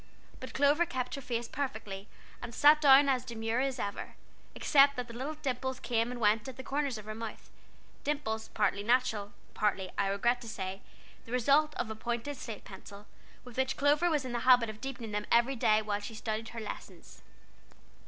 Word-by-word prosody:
But 260 Hz, -, -9 dB
Clover 290 Hz, +5 st, +4 dB
kept 255 Hz, -6 st, -3 dB
her 275 Hz, -, -4 dB
face 240 Hz, -2 st, -3 dB
perfectly, 215 Hz, -8 st, -5 dB, 0.3 s
and 235 Hz, -1 st, -7 dB
sat 300 Hz, +1 st, +6 dB
down 280 Hz, -1 st, +7 dB
as 260 Hz, -2 st, +2 dB
demure 230 Hz, -1 st, -2 dB
as 270 Hz, 0 st, 0 dB
ever, 200 Hz, -4 st, -5 dB, 0.4 s
except 280 Hz, 0 st, +5 dB
that 250 Hz, -2 st, -4 dB
the 235 Hz, -, -10 dB
little 270 Hz, +6 st, -4 dB
dimples 260 Hz, -3 st, -3 dB
came 230 Hz, -1 st, 0 dB
and 250 Hz, -1 st, -6 dB
went 215 Hz, +1 st, +2 dB
at 260 Hz, -1 st, -8 dB
the 260 Hz, -, -7 dB
corners 280 Hz, -3 st, -1 dB
of 215 Hz, -, -9 dB
her 215 Hz, -, -5 dB
mouth; 225 Hz, 0 st, -8 dB, 0.5 s
dimples, 270 Hz, -7 st, -2 dB
partly 210 Hz, -1 st, 0 dB
natural, 230 Hz, -2 st, +2 dB
and 205 Hz, -, -25 dB
partly, 195 Hz, -3 st, 0 dB
I 200 Hz, -, +2 dB
regret 235 Hz, +5 st, +1 dB
to 230 Hz, -, -8 dB
say, 190 Hz, -3 st, -5 dB, 0.4 s
the 230 Hz, -, -12 dB
result 280 Hz, +5 st, +3 dB
of 220 Hz, -, -3 dB
a -, -, -4 dB
pointed 240 Hz, +5 st, -3 dB
slate 225 Hz, -4 st, -7 dB
pencil, 200 Hz, +1 st, -11 dB, 0.4 s
with 250 Hz, -1 st, -12 dB
which 265 Hz, 0 st, 0 dB
Clover 295 Hz, +4 st, +3 dB
was 300 Hz, -4 st, 0 dB
in 255 Hz, -, -4 dB
the 240 Hz, -, -1 dB
habit 245 Hz, -3 st, +5 dB
of 215 Hz, -, -15 dB
deepening 245 Hz, -4 st, -5 dB
them 210 Hz, 0 st, -3 dB
every 240 Hz, +3 st, +4 dB
day 215 Hz, -2 st, +3 dB
while 205 Hz, -1 st, -1 dB
she 215 Hz, +2 st, -8 dB
studied 220 Hz, 0 st, -3 dB
her 230 Hz, -, -7 dB
lessons. 215 Hz, -, -9 dB
240 Hz, 200 wpm, -31 LUFS, 215-270 Hz, 0.5 s, down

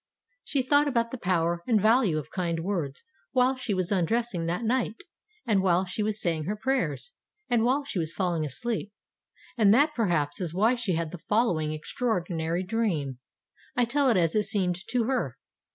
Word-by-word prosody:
She 275 Hz, -4 st, 0 dB
thought 290 Hz, +3 st, +4 dB
about 235 Hz, -4 st, 0 dB
the 260 Hz, -, -5 dB
power 170 Hz, -3 st, +1 dB
and 225 Hz, -4 st, +4 dB
value 215 Hz, -5 st, +3 dB
of 150 Hz, -, -5 dB
kind 170 Hz, -3 st, -1 dB
words 165 Hz, -7 st, -3 dB, 0.3 s
while 255 Hz, 0 st, +3 dB
she 255 Hz, -4 st, -4 dB
was 185 Hz, 0 st, -2 dB
undressing 200 Hz, -1 st, 0 dB
that 180 Hz, +7 st, -1 dB
night, 230 Hz, -1 st, -1 dB, 0.4 s
and 210 Hz, -5 st, +3 dB
while 185 Hz, 0 st, +2 dB
she 185 Hz, +4 st, -3 dB
was 215 Hz, 0 st, -1 dB
saying 165 Hz, -5 st, -1 dB
her 205 Hz, +5 st, -1 dB
prayers, 255 Hz, -, -1 dB, 0.4 s
and 235 Hz, -2 st, +3 dB
while 265 Hz, +4 st, +2 dB
she 245 Hz, -9 st, -3 dB
was 160 Hz, -1 st, -1 dB
falling 170 Hz, -1 st, -1 dB
asleep. 205 Hz, -, -3 dB, 0.7 s
And 205 Hz, -3 st, +6 dB
that, 295 Hz, +4 st, +4 dB
perhaps, 170 Hz, -, 0 dB
is 170 Hz, -2 st, -3 dB
why 220 Hz, +6 st, +4 dB
she 235 Hz, -7 st, -1 dB
had 165 Hz, -1 st, -2 dB
the 180 Hz, -, -7 dB
follow 210 Hz, -6 st, +3 dB
ing 155 Hz, -1 st, -2 dB
extraordinary 170 Hz, -1 st, -2 dB
dream. 180 Hz, -, -1 dB, 0.6 s
I 245 Hz, -2 st, +3 dB
tell 275 Hz, +3 st, +2 dB
it 225 Hz, -, +3 dB
as 165 Hz, -2 st, +2 dB
it 210 Hz, -1 st, +2 dB
seemed 185 Hz, -4 st, 0 dB
to 245 Hz, -2 st, +1 dB
her. 230 Hz, -, -1 dB
200 Hz, 185 wpm, -27 LUFS, 170-235 Hz, 0.7 s, And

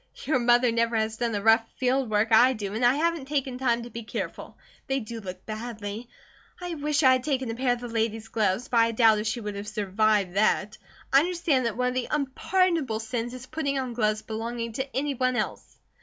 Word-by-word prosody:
"Your 290 Hz, -3 st, +2 dB
mother 240 Hz, 0 st, +4 dB
never 230 Hz, 0 st, +1 dB
has 220 Hz, 0 st, -1 dB
done 235 Hz, -1 st, -1 dB
the 205 Hz, -2 st, -2 dB
rough 225 Hz, +1 st, +5 dB
field 260 Hz, -1 st, +1 dB
work 215 Hz, +1 st, +2 dB
I 245 Hz, +4 st, +6 dB
do, 205 Hz, -4 st, -5 dB
and 225 Hz, +3 st, -2 dB
I 245 Hz, +2 st, +5 dB
haven't 325 Hz, -2 st, 0 dB
taken 270 Hz, -3 st, -2 dB
time 240 Hz, -2 st, +1 dB
to 240 Hz, -, -10 dB
be 230 Hz, -, -6 dB
careful. 215 Hz, -, -6 dB, 0.3 s
They 270 Hz, 0 st, 0 dB
do 230 Hz, -1 st, -7 dB
look 185 Hz, -3 st, -8 dB
badly. 220 Hz, 0 st, -6 dB, 0.5 s
I 355 Hz, -1 st, -5 dB
wish 300 Hz, 0 st, 0 dB
I 260 Hz, -, +7 dB
had 255 Hz, -1 st, +2 dB
taken 265 Hz, -5 st, -1 dB
a -, -, -3 dB
pair 250 Hz, 0 st, +1 dB
of 245 Hz, -, -6 dB
the 245 Hz, -, -5 dB
lady's 225 Hz, -1 st, -2 dB
gloves; 220 Hz, +2 st, 0 dB
but 240 Hz, -, 0 dB
I 230 Hz, 0 st, +4 dB
doubt 220 Hz, -2 st, +5 dB
if 215 Hz, -, -3 dB
she 220 Hz, +2 st, -2 dB
would 210 Hz, -1 st, -4 dB
have 200 Hz, +1 st, -6 dB
survived 210 Hz, -2 st, +1 dB
that. 210 Hz, 0 st, +1 dB, 0.3 s
I 275 Hz, -, +8 dB
understand 325 Hz, -6 st, +1 dB
that 225 Hz, -1 st, -4 dB
one 250 Hz, 0 st, +1 dB
of -, -, -4 dB
the 255 Hz, -1 st, -2 dB
unpardonable 300 Hz, -2 st, 0 dB
sins 235 Hz, +2 st, -4 dB
is 255 Hz, 0 st, -9 dB
putting 280 Hz, 0 st, -2 dB
on 255 Hz, -2 st, -3 dB
gloves 215 Hz, -2 st, 0 dB
belonging 230 Hz, +1 st, -4 dB
to 265 Hz, +2 st, -4 dB
any 285 Hz, +1 st, 0 dB
one 255 Hz, -1 st, 0 dB
else." -, -, -4 dB
240 Hz, 225 wpm, -26 LUFS, 220-265 Hz, 0.5 s, I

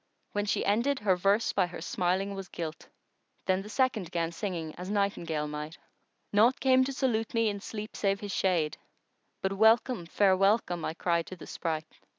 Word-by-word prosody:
When 205 Hz, 0 st, -1 dB
she -, -, 0 dB
ended, 235 Hz, +8 st, +2 dB
her 195 Hz, -3 st, +3 dB
verse 200 Hz, +5 st, +2 dB
by 190 Hz, -3 st, +2 dB
her 175 Hz, -, -8 dB
smiling 185 Hz, +3 st, -1 dB
was 195 Hz, -1 st, -6 dB
gilt: 165 Hz, -2 st, -6 dB, 0.3 s
* -, -, -44 dB
Then 185 Hz, 0 st, +2 dB
the 205 Hz, -, -9 dB
second 225 Hz, -8 st, +1 dB
'gan 170 Hz, -2 st, -1 dB
singing 170 Hz, -3 st, -4 dB
as 180 Hz, +1 st, -7 dB
nightingale 170 Hz, -7 st, -1 dB
might:— 150 Hz, +2 st, -6 dB, 0.6 s
Naught 225 Hz, +5 st, +5 dB
came 260 Hz, -1 st, +5 dB
to 275 Hz, -, -2 dB
salute 235 Hz, -4 st, -1 dB
me 230 Hz, -1 st, +3 dB
in 200 Hz, -1 st, -4 dB
sleep 215 Hz, +1 st, -7 dB
save 200 Hz, -1 st, +1 dB
his 205 Hz, -2 st, -5 dB
shade 170 Hz, -6 st, +1 dB, 0.3 s
* -, -, -47 dB
But 190 Hz, 0 st, +1 dB
'welcome, 220 Hz, -1 st, +3 dB
fair 190 Hz, +1 st, +4 dB
welcome,' 195 Hz, -3 st, +2 dB
I 160 Hz, -, -3 dB
cried 170 Hz, -1 st, 0 dB
to 185 Hz, -, -7 dB
the 170 Hz, -, -11 dB
spright! 155 Hz, -2 st, -3 dB
195 Hz, 190 wpm, -29 LUFS, 170-215 Hz, 0.6 s, Naught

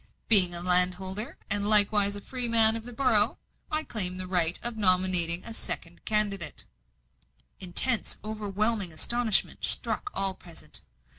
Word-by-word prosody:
Being 185 Hz, -5 st, +8 dB
a 170 Hz, -, -2 dB
landholder, 185 Hz, +4 st, +2 dB
and 205 Hz, 0 st, 0 dB
likewise 205 Hz, -1 st, +5 dB
a 205 Hz, -, -8 dB
freeman 230 Hz, -2 st, +2 dB
of 225 Hz, 0 st, -8 dB
this 245 Hz, -1 st, -10 dB
borough, 230 Hz, -4 st, 0 dB, 0.3 s
I 310 Hz, 0 st, -3 dB
claim 185 Hz, -9 st, -1 dB
the 185 Hz, -, -6 dB
right 180 Hz, -2 st, -1 dB
of 240 Hz, -1 st, -3 dB
nominating 185 Hz, -4 st, +1 dB
a 230 Hz, -, -9 dB
second 175 Hz, -5 st, -6 dB
candidate." 200 Hz, -6 st, -3 dB, 1.0 s
Intense, 205 Hz, +6 st, 0 dB
overwhelming 215 Hz, -2 st, -4 dB
astonishment 225 Hz, +7 st, -1 dB
struck 415 Hz, -, -3 dB
all 195 Hz, -1 st, -2 dB
present. 170 Hz, -3 st, -4 dB
205 Hz, 135 wpm, -25 LUFS, 180-225 Hz, 1.0 s, Being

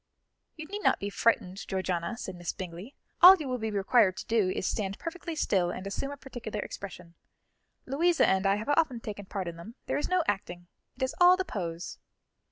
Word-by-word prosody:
"You 315 Hz, -, -7 dB
need 405 Hz, +6 st, -5 dB
not -, -, +3 dB
be 200 Hz, 0 st, -4 dB
frightened, 200 Hz, -4 st, 0 dB
Georgiana," 185 Hz, +1 st, -2 dB
said 190 Hz, -, -6 dB
Miss 175 Hz, -1 st, -4 dB
Bingley; 185 Hz, +6 st, -8 dB, 0.3 s
"all 365 Hz, +2 st, +12 dB
you 310 Hz, -6 st, -6 dB
will 255 Hz, -1 st, -2 dB
be 220 Hz, 0 st, -2 dB
required 200 Hz, -1 st, +3 dB
to -, -, -6 dB
do 220 Hz, -5 st, +2 dB
is 185 Hz, -, -2 dB
to -, -, +1 dB
stand 200 Hz, -3 st, -3 dB
perfectly 335 Hz, 0 st, -6 dB
still 190 Hz, -, +1 dB
and 185 Hz, +2 st, -6 dB
assume 200 Hz, +8 st, -3 dB
a 285 Hz, -, -7 dB
particular 245 Hz, -6 st, -6 dB
expression. 180 Hz, -4 st, -8 dB, 0.7 s
Louisa 330 Hz, +6 st, +3 dB
and 190 Hz, +1 st, +2 dB
I 195 Hz, -, +4 dB
have 215 Hz, +6 st, -5 dB
often 290 Hz, -5 st, +2 dB
taken 205 Hz, -3 st, -7 dB
part 190 Hz, -3 st, -4 dB
in 170 Hz, -1 st, -6 dB
them; 215 Hz, +8 st, -10 dB
there -, -, -1 dB
is 295 Hz, -, -3 dB
no 365 Hz, -1 st, +2 dB
acting, 175 Hz, -3 st, -3 dB, 0.3 s
it 260 Hz, -, -4 dB
is 260 Hz, +3 st, -1 dB
all 360 Hz, +1 st, +8 dB
the 375 Hz, -, -1 dB
pose." 170 Hz, -, -5 dB
210 Hz, 210 wpm, -29 LUFS, 185-275 Hz, 0.7 s, all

